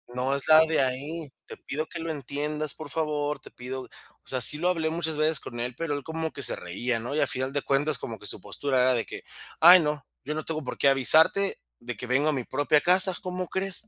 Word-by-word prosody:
no 130 +2 0
es 140 - -4
la 155 - +9
de 160 -3 +1
ahí. 140 +5 -3 0.2
"Te - - -9
pido 155 +3 -5
que 170 - -7
lo 165 0 -3
entiendas, 150 +1 -2
por 155 -2 -9
favor, 150 -1 -2
te - - -15
pido". 130 +1 -7 0.4
Osea, 130 -1 -2
sí 150 - +5
lo 175 +4 0
hablé 165 -3 0
muchas 160 -1 -2
veces 155 0 +1
con 120 - -8
él, 125 0 -3
pero 165 -3 -2
él 145 - -5
como 160 +1 -4
que 140 - -7
se - - +1
reía, 115 +7 -3
¿no? 125 +5 -5
Y 155 - +1
a 145 - +2
final 130 0 -3
de 145 - -1
cuentas, 145 +2 0
como 110 -2 -7
que 105 - -12
su - - -2
postura 130 +5 -1
era 130 0 +4
de 115 - -2
que: - - -9 0.4
"Ay 175 +3 +10
no, 150 -1 -2 0.2
yo 150 - -3
no 155 - -3
tengo 155 -1 -3
por 125 - -6
qué 140 - +4
avisarte 160 +9 +5 0.2
de 125 0 -6
que 125 - -6
vengo 135 +5 +2
a - - +1
mi 130 -4 -2
propia 145 +3 +1
casa". 185 +1 +3
¿Cómo 180 0 -4
crees? 195 +3 +1
145 Hz, 250 wpm, -26 LUFS, 130-160 Hz, 0.4 s, Ay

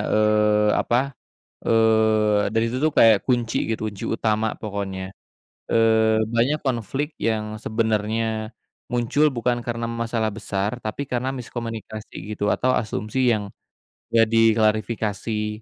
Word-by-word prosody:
eee, 105 0 +3
apa, 130 +4 0 0.5
eee, 110 -2 +3
dari 115 0 +2
situ 125 +2 -3
tuh 155 - -5
kayak 110 -3 +7
kunci 120 -3 0
gitu, 110 - -2
kunci 105 -2 -8
utama 110 0 +1
pokoknya. 95 -3 -5 0.6
Eee, 110 -1 +4
banyak 135 +6 +2
konflik 135 - -2
yang 110 -1 -1
sebenarnya, 110 0 -1 0.4
muncul 125 +5 +2
bukan 120 0 0
karena 115 -1 -3
masalah 115 -1 -1
besar, 105 +1 -3
tapi 110 +6 -3
karena 125 +1 -1
miskomunikasi 115 -3 -7 0.2
gitu, 105 - -1
atau 130 - +1
asumsi 110 +1 -2
yang 105 -2 -1 0.7
enggak 115 -1 +5
diklarifikasi, 110 -1 +1
110 Hz, 120 wpm, -23 LUFS, 105-115 Hz, 0.7 s, kayak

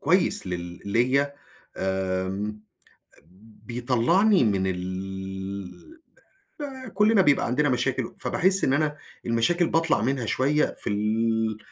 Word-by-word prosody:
كويس 180 - +2
لل 90 -1 -5
ليَّ 130 +7 +2 0.4
آمم. 95 +2 -2 1.1
بيطلّعني 125 - +3
من 95 -3 +1
ال 95 - -6 0.7
آآ، 260 -1 -9
كلّنا 210 +1 +4
بيبقى 145 -6 +3
عندنا 145 +4 +1
مشاكل، 130 -1 -1
فباحس 190 +1 +1
إن 135 - +3
أنا 150 0 0 0.3
المشاكل 120 +10 +2
باطلّع 165 -7 +2
منها 130 +1 0
شوية 140 +6 +1
في - - -2
ال 110 +1 0
120 Hz, 110 wpm, -25 LUFS, 95-150 Hz, 1.1 s, كلّنا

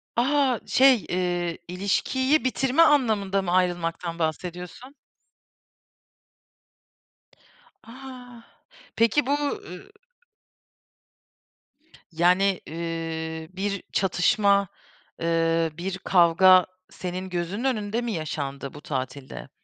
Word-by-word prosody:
A! 265 0 +2
Şey, 255 -8 +4
ııı, 175 -1 -1
ilişkiyi 260 - 0
bitirme 265 +3 +2
anlamında 220 -11 +3
mı 180 -2 -3
ayrılmaktan 175 -2 -1
bahsediyorsun? 180 - -5 2.9
A! 250 -1 -11 0.5
Peki 230 +5 +3
bu, 275 - -1
ııı 285 - -5 2.2
Yani, 180 +3 +2
ııı, 160 -1 -5
bir 200 0 -2
çatışma, 200 +2 +2 0.5
ııı, 165 0 +1
bir 190 +2 -4
kavga 185 0 +5 0.2
senin 185 0 -6
gözünün 180 +6 -3
önünde 225 -3 -1
mi 240 -1 -3
yaşandı 140 -4 -5
bu 145 - -11
tatilde? 130 - -6
185 Hz, 85 wpm, -25 LUFS, 165-230 Hz, 2.9 s, kavga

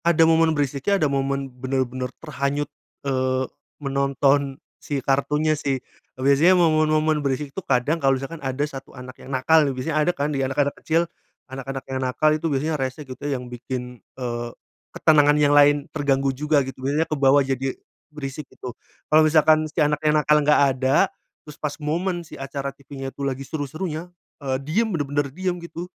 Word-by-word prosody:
Ada 165 -1 +5
momen 160 -1 +3
berisiknya, 145 +7 +1
ada 155 - +1
momen 140 -1 0
bener-bener 130 0 -2
terhanyut, 145 -1 -2 0.4
eee, 130 -1 0 0.3
menonton 140 0 +1 0.2
si 145 - -3
kartunnya 140 +3 +1
sih. 140 -3 -1 0.4
Biasanya 140 +8 +4
momen-momen 155 -2 +3
berisik 140 0 -2
tuh 190 - -4
kadang 140 +2 0
kalau 135 -1 +3
misalkan 145 +5 -7
ada 135 +1 -1
1 135 -2 -10
anak 125 0 -9
yang - - -11
nakal 140 +5 +4
nih, 140 -3 +1
biasanya 150 +5 -2
ada 175 - +3
kan 145 +1 -1
di 135 - -1
anak-anak 135 +2 0
kecil, 165 +2 +2 0.5
anak-anak 135 0 -5
yang 130 0 -4
nakal 130 +4 +2
itu 155 +1 -1
biasanya 150 +1 -1
rese 130 +3 -4
gitu 130 0 -10
yang 130 -3 -2
bikin, 125 0 -6 0.2
eee, 120 -2 -3 0.4
ketenangan 150 -1 +4
yang 145 -1 +4
lain 145 0 +5
terganggu 140 -2 +1
juga 145 0 +1
gitu, 130 -1 -9
biasanya 145 +4 +1
kebawa 140 -2 +3
jadi 135 0 -2 0.3
berisik, 150 -1 -6
gitu. 125 - -8 0.3
Kalo 155 +1 +5
misalkan 155 0 +4
si 155 - -5
anak 150 0 0
yang 155 0 +3
nakal 150 0 +4
nggak 150 0 +4 0.2
ada, 130 +2 +4 0.4
terus 150 - -10
pas 145 -1 -3
momen 170 +3 -2
si - - -14
acara 140 0 -4
TV-nya 135 -1 -8
tuh 140 - -7
lagi 135 +1 -5
seru-serunya, 155 +4 -4 0.3
eee, 135 -2 -1
diem 215 +10 +1
bener-bener 145 -5 -1
diem 180 +4 -3
gitu, 170 0 -7
140 Hz, 170 wpm, -23 LUFS, 135-155 Hz, 0.5 s, Ada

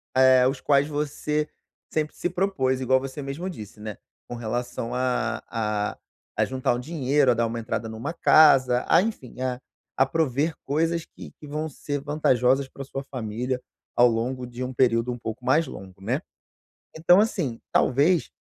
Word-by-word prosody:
eh, 130 -1 +6
os 135 0 -2
quais 140 0 +3
você 150 0 -2 0.4
sempre 155 -1 -1
se 175 - -2
propôs, 165 -9 0
igual 130 +1 +3
você 135 +2 -6
mesmo 145 +7 -4
disse, 105 - -9
né, 105 -2 -6 0.3
com 120 - -5
relação 120 0 -3
a 125 -2 0
a 105 -2 -2 0.4
a - - +4
juntar 130 -2 0
um - - -3
dinheiro, 140 -2 +2
a - - +4
dar 115 0 +1
uma 115 +1 -4
entrada 115 0 -3
em - - -7
uma 115 +9 -4
casa, 130 -7 +5
ah, - - +6
enfim, 135 - -5
a 125 -1 -2 0.4
a 135 - +5
prover 150 +1 0
coisas 165 +3 0
que - - -12
que 150 - -11
vão 155 +2 -3
ser 145 +1 -4
vantajosas 135 -3 +2
pra 140 - -8
sua 135 0 -5
família 125 0 -3 0.3
ao 120 0 +6
longo 125 +2 -2
de 125 +1 -6
um 130 - -3
período 120 -1 +2
um 120 - -4
pouco 115 +2 -6
mais 155 +6 +3
longo, 95 -1 -10
né. 125 - -1 0.8
Então 175 +4 +6
assim, 160 - -1
talvez, 150 +6 +3
130 Hz, 175 wpm, -25 LUFS, 120-150 Hz, 0.8 s, eh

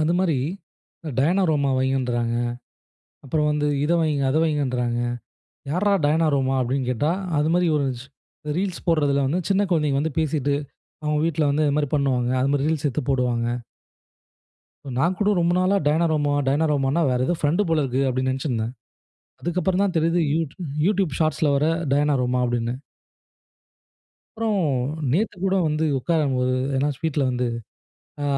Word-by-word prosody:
அந்த 155 +2 +2
மாரி 170 -7 +1 0.7
அ 155 - -3
டயனாரோமா 155 -3 +2
வையின்ராங்க. 125 -3 0 0.9
அப்புறம் 150 +2 0
வந்து 150 0 0 0.2
இதை 165 +3 +2
வையுங்க, 150 -4 0
அதை 155 +4 +2
வையுங்கன்றாங்க. 125 -6 0 0.7
யார்ரா 200 +6 +2
டயனாரோமா 145 -4 +2
அப்படின்னு 130 +1 -1
கேட்டா, 145 +6 0 0.3
அது 150 +2 +2
மாதிரி 180 -1 +2
ஒரு 140 -2 +1
ஸ் 130 - -11 0.5
ரீல்ஸ் 185 -1 -3
போடுறதுல 145 -4 +2
வந்து, 165 +7 0
சின்ன 195 +1 +3
கொழந்தைங்க 150 -5 +1
வந்து 155 -1 -3
பேசிட்டு, 145 -3 0 0.5
அவங்க 150 0 +1
வீட்ல 155 -3 +1
வந்து 150 +2 +1
இது 145 0 +1
மாரி 145 -1 0
பண்ணுவாங்க. 130 -4 +1
அது 135 +2 +1
மாரி, 145 0 +1
ரீல்ஸ் 155 -2 0
எடுத்து 140 +3 -2
போடுவாங்க. 120 -3 0 1.5
நான் 170 +8 +2
கூட 205 - +1
ரொம்ப 170 0 +2
நாளா 185 +2 +2
டயனாரோமா 155 -2 +2
டயனாரோமானா 145 +1 +1
வேற 125 - 0
ஏதோ 175 - +1
ஃபிரெண்ட்டு 170 +7 +1
போல 160 -2 +2
இருக்கு 135 0 0
அப்படின்னு 130 0 0
நினைச்சிருந்தேன். 125 -4 -2 0.7
அதுக்கப்புறம் 180 +2 0
தான் 195 -2 0
தெரிகிறது 165 +2 +2
யூட் 160 -3 -2 0.3
YouTube 195 -7 +1
Shortsல 155 -1 +1
வர 145 +2 +2 0.3
டயனாரோமா 135 -3 +2
அப்படின்னு. 120 -1 -1 1.6
அப்புறோம் 215 -4 0 0.5
நேத்துகூட 190 - 0
வந்து 155 +1 0
உட்காரும்போது 130 -4 0 0.2
ஏன்னா 140 +2 +1
வீட்ல 150 -1 -1
வந்து 125 0 -1 0.8
ஆ - - -1
150 Hz, 140 wpm, -23 LUFS, 135-165 Hz, 1.6 s, சின்ன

